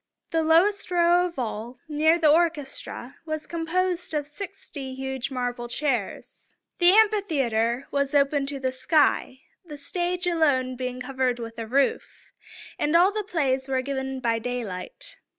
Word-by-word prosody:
The 325 - +2
lowest 345 +7 +3
row 350 0 +4
of 340 - -12
all, 235 0 -4
near 310 +2 +3
the 315 -3 +4
orchestra, 300 -6 -1
was 310 -1 -4
composed 345 +1 -1
of 295 -1 0
sixty 295 -5 -8
huge 265 -1 -3
marble 245 -2 -3
chairs. 245 -5 -3 0.3
The 350 0 +6
amphitheater 275 - +2
was 280 +1 0
open 280 0 +2
to 280 0 -3
the 260 -1 -1
sky, 260 0 +1 0.2
the 300 -4 -9
stage 355 +5 -2
alone 285 -7 +2
being 250 0 -4
covered 255 -1 -1
with 230 -1 -7
a 225 - -4
roof; 270 +4 -1 0.5
and 300 +2 +1
all 360 +4 +6
the 425 0 -2
plays 280 -9 0
were 260 -1 0
given 265 -1 -3
by 230 -2 0
daylight. 225 -7 -5
280 Hz, 150 wpm, -25 LUFS, 255-335 Hz, 0.5 s, The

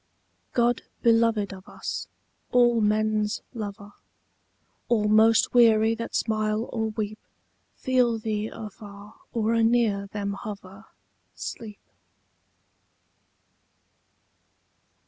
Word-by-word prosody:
God 240 0 +2 0.2
beloved 225 -3 +3
of 190 -1 -12
us, - - -5 0.4
all 240 -2 +4
men's 215 0 +1
lover, 205 -2 -7 1.0
All 215 -3 +2
most 220 +1 +4
weary 225 -2 +5
that 230 0 -5
smile 215 +1 0
or 220 -2 -1
weep 215 0 -4 0.6
Feel 250 -3 +1
thee 215 -1 -2
afar 205 -1 -10 0.2
or 225 -1 0
anear 225 -3 +2
them 200 0 -4
hover, 200 0 -9 0.5
Sleep. 215 -4 -7
215 Hz, 90 wpm, -26 LUFS, 210-230 Hz, 1.0 s, weary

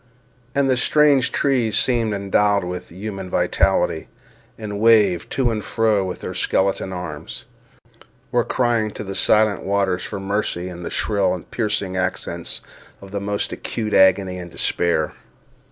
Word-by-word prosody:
And 140 -1 +3
the 130 -1 +2
strange 145 -1 +4
trees 125 -6 +1
seemed 120 -3 +2
endowed 100 0 +1
with 90 0 -6
a 85 - -15
human 95 -1 -6
vitality, - - +1 0.5
and 105 -2 -5
waving 105 -6 +4
to 125 -3 +1
and 110 -2 -3
fro 105 -5 +1
their - - -7
skeleton 95 0 0
arms, 90 -5 -7 0.9
were 120 -1 +2
crying 120 -4 +1
to - - -5
the 95 -1 -6
silent 105 0 +3
waters 95 -2 0
for 100 - -5
mercy, 95 -2 -2
in 90 -1 -8
the 85 - -5
shrill 100 -4 +1
and 90 - -11
piercing 105 -5 -1
accents 90 -2 -3 0.4
of 100 -1 -12
the 100 -1 -3
most 100 0 -2
acute 110 -2 -4
agony 95 -1 +4
and 90 -1 -8
despair. 85 -1 0
100 Hz, 150 wpm, -21 LUFS, 95-110 Hz, 0.9 s, strange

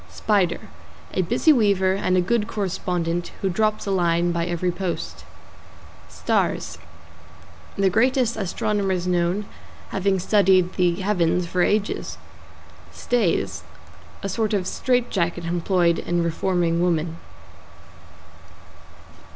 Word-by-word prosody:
=SPIDER= 180 - 0 0.5
A - - +1
busy 315 - +3
weaver 200 -6 +3
and 185 -1 +1
a - - +4
good 210 +3 0
correspondent, 175 -3 -2
who 190 - +1
drops 215 +3 0
a 200 - -2
line 175 -2 +2
by 170 0 -1
every 175 +1 -1
post. 180 -1 -5 0.8
=STARS= - - -1 1.0
The 195 -1 +2
greatest 250 +2 +2
astronomers 195 -2 -1
known, 180 +3 0 0.4
having 195 0 0
studded 190 -1 +3
the 175 -2 +2
heavens 180 -3 +1
for 180 +1 -1
ages. 210 +3 0 0.7
=STAYS= 165 - 0 0.6
A 200 - -2
sort 215 +1 0
of 190 -3 -1
straight 245 +4 0
jacket 170 -2 -1
employed 175 0 +1
in 175 0 -1
reforming 170 0 0
women. 165 -2 0
185 Hz, 110 wpm, -23 LUFS, 175-205 Hz, 1.0 s, a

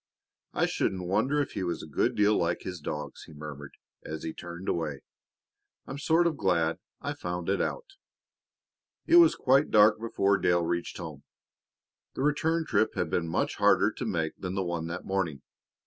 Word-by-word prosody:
"I - - +3
shouldn't 95 -2 -1
wonder 130 +10 +1
if - - -9
he - - -4
was 85 -2 -2
a - - -8
good 75 - 0
deal 105 +1 +4
like 85 0 0
his 90 -2 -5
dogs," 75 -1 -6
he 80 - -14
murmured 75 -1 -9 0.3
as 80 0 -6
he 80 - -4
turned 85 +2 -8
away. 75 -5 -2 0.8
"I'm 135 - -7
sort 165 +4 +3
of 165 -4 +1
glad 85 -4 +1 0.2
I - - -3
found 90 0 -4
it 100 - +1
out." - - -2 1.2
It 340 - +6
was 340 -2 +7
quite 135 +2 +3
dark 105 0 +6
before 100 -3 +1
Dale 85 -1 +2
reached 85 +1 -2
home. 80 -5 -7 0.9
The - - -2
return 160 +3 +1
trip 110 - +1
had 85 -3 -1
been 85 -1 0
much 80 - -1
harder - - +4
to - - -6
make 80 -2 -1
than 90 0 -4
the 95 - 0
one 85 -1 -3
that 85 +2 -6
morning. 85 -8 -2
90 Hz, 180 wpm, -28 LUFS, 80-110 Hz, 1.2 s, was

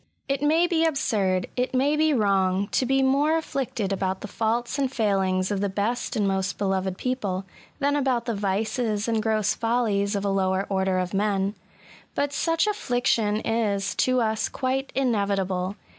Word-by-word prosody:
It 275 0 -1
may 315 +4 +3
be 335 -2 +1
absurd 205 - +1
— - - -33
^it 250 +1 -1
may 280 +4 +3
be 310 +1 +3
wrong 195 -5 +2
— - - -33
to 255 - +1
be 270 +1 +3
more 285 +4 +3
afflicted 245 -10 -2
about 190 -1 -2
the - - -5
faults 235 +6 -1
and 270 -2 0
failings 195 -5 +1
of 200 -1 -1
the. 200 - 0
best 210 +5 -2
and 205 -2 +1
most 190 -1 -1
beloved 190 -2 -1
people^ 205 -8 -2 0.3
than 285 0 +1
about 260 -4 +1
the 235 - -1
yices 210 +2 -1
and 225 -1 +1
gross 215 -1 +1
follies 225 -3 0
of 200 0 -2
a - - +1
lower 190 0 +1
order 190 -1 +1
of 180 0 -2
men; 200 0 +1 0.6
but 285 0 0
such 330 +3 +1
affliction 245 - 0
is, 205 -3 0
to 255 0 +2
us, 220 -1 0
quite 265 +1 -2
inevitable. 200 -6 0
215 Hz, 175 wpm, -25 LUFS, 195-260 Hz, 0.6 s, may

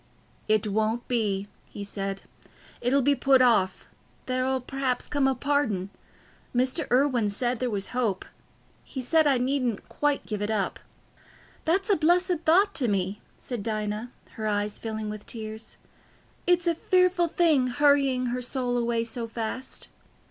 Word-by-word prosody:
"It 215 -1 +2
won't 220 +3 0
be," 205 -5 0 0.2
he 205 - -7
said, 195 -1 -4 0.6
"it'll 260 +3 +2
be 285 +2 +4
put 270 0 +4
off—there'll 255 +4 0
perhaps 260 -1 -2
come 285 -2 +1
a 265 - +1
pardon. 240 -11 0 0.6
Mr. 255 +5 +1
Irwine 250 -4 +3
said 240 +3 0
there 255 - 0
was 200 -3 -2
hope. 230 -7 -1 0.6
He 265 - -7
said, 310 +5 +3
I 275 -2 +4
needn't 250 -3 -1
quite 295 -1 0
give 210 -2 -4
it 205 - -1
up." 210 -4 -1 0.9
"That's 380 +6 +1
a - - +5
blessed 350 +3 +2
thought 390 +6 +4
to 260 -6 0
me," 195 -1 -1 0.2
said 245 -4 -5
Dinah, 215 +1 -3 0.2
her 220 -2 -4
eyes 205 0 -1
filling 220 -1 -4
with 210 -1 -9
tears. 220 -1 -6 0.7
"It's 355 0 +3
a 340 - +3
fearful 365 +1 +2
thing 315 -6 +3
hurrying 270 -2 +3
her 250 - -2
soul 245 -1 -1
away 235 -1 0
so 230 0 -4
fast." 230 +3 -5
245 Hz, 150 wpm, -27 LUFS, 215-280 Hz, 0.9 s, a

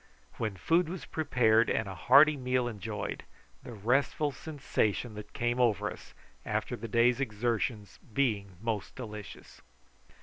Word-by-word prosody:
Then 110 -4 -2
food 165 - +2
was 185 0 -6
prepared 115 -7 +2
and 110 - 0
a 95 - -5
hearty 140 - +6
meal 125 -2 0
enjoyed, 110 -1 -4 0.4
the 120 - -9
restful 130 +7 +1
sensation 130 -7 -2
that 105 0 -9
came 120 +1 -1
over 115 -6 +2
us - - -12 0.3
after - - -2
the 115 - -6
day's 120 +3 +3
exertion 115 -2 -1 0.3
being 105 -7 0
most 110 -4 -3
delicious. 105 -5 -9
120 Hz, 135 wpm, -30 LUFS, 105-130 Hz, 0.4 s, hearty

